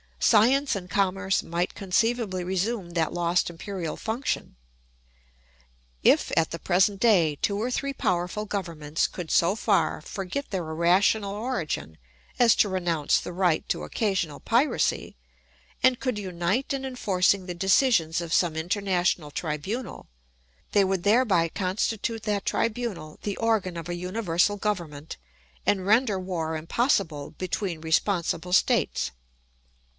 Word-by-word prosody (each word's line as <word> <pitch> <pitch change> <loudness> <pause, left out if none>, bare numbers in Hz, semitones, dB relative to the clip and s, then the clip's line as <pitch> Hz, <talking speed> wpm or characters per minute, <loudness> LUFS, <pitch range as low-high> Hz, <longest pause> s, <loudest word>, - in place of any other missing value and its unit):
Science 255 +5 +4
and 180 -2 -6
commerce 195 +1 +1
might 170 +2 -2
conceivably 200 -1 0
resume 190 +1 -2
that 165 -2 0
lost 175 0 +1
imperial 175 -1 -5
function. 230 - -3 1.5
If - - +4
at 165 - +2
the 165 - -5
present 190 +2 +2
day 175 -10 +3
two 200 - 0
or 235 +4 -1
three 275 +2 -2
powerful 180 0 -1
governments 165 -7 -2
could 175 -3 -7
so 170 +4 +3
far - - +1
forget 195 +9 -5
their 180 -5 -3
irrational 185 +5 +2
origin 200 - -3 0.4
as 240 -2 +6
to 205 - +4
renounce 175 -5 +1
the 180 - -7
right 175 -3 +1
to - - -1
occasional 190 -9 -1
piracy 245 +6 +1 0.7
and 255 -1 +4
could 255 -5 -2
unite 185 +5 -1
in 270 -1 -3
enforcing 200 -7 +1
the 180 -1 -5
decisions 185 - +3
of 165 -1 -4
some 170 -3 +2
international 175 -2 0
tribunal, 170 - -4 0.6
they 205 - +4
would 190 -2 -1
thereby 205 -5 +3
constitute 210 +5 -2
that 210 -2 -1
tribunal 215 -9 -2
the 205 -2 -3
organ 220 -6 0
of 170 0 -6
a 175 - -2
universal 180 +1 0
government 170 -8 -4 0.5
and 190 -2 +1
render 215 -1 +3
war 170 -4 -3
impossible 160 - 0
between 180 -1 -3
responsible 170 +1 0
states. 60 - +2
190 Hz, 130 wpm, -26 LUFS, 170-215 Hz, 1.5 s, as